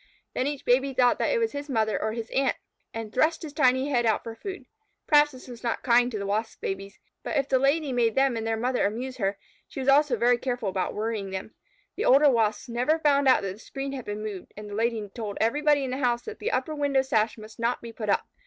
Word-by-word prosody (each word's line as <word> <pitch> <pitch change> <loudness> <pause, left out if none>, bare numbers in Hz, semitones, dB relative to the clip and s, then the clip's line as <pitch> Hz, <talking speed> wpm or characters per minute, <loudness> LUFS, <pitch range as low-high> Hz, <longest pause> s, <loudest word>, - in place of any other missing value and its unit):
Then 255 - 0
each 290 -1 -4
baby 265 +2 +2
thought 245 -1 +3
it - - +2
was 455 -1 0
his 285 +1 -6
mother 220 -4 0
or 220 0 -1
his 230 -1 -6
aunt, 270 -1 +1 0.3
and 225 -2 -6
thrust 320 +5 +2
his 300 -3 -7
tiny 260 -1 +3
head 245 -4 +2
out 220 -2 +1
for 230 - -6
food. 385 - -7 0.4
Perhaps 295 -1 +5
this 255 -2 -13
was 240 -2 -10
not 235 -2 -2
kind 245 0 +4
to 215 - -3
the 200 - -4
Wasp 215 +3 -2
babies, 195 +1 -5 0.2
but - - -2
if 275 -1 +1
the 260 - +2
Lady 280 +1 +1
made 230 -3 +2
them 270 -2 +3
and 225 0 -3
their 225 0 0
mother 250 -1 +1
amuse 250 +5 -5
her, 195 -3 -1 0.3
she - - -8
was 260 - -3
also 280 -1 +5
very 240 +2 +3
careful 245 -5 -2
about 185 0 -2
worrying 215 -2 -2
them. 190 +3 -6 0.4
The - - -1
older 280 +2 +6
Wasps 220 -1 +1
never 250 +7 +1
found 285 -3 +3
out 255 - +5
that 195 -1 -3
the 205 - -15
screen 275 +3 -6
had 265 -3 -6
been 210 +1 -5
moved, 205 -4 -7
and 210 0 -8
the 205 - -8
Lady 225 -1 -1
told 215 -4 -5
everybody 290 +5 +2
in 260 - -3
the 260 - -2
house 240 -3 0
that 440 -1 -8
the 455 - -2
upper 315 - -1
window 285 -3 +1
sash 220 -4 +1
must 215 0 -12
not 235 +2 0
be 230 -1 -9
put 215 -2 -5
up. - - +1
245 Hz, 250 wpm, -26 LUFS, 220-275 Hz, 0.4 s, older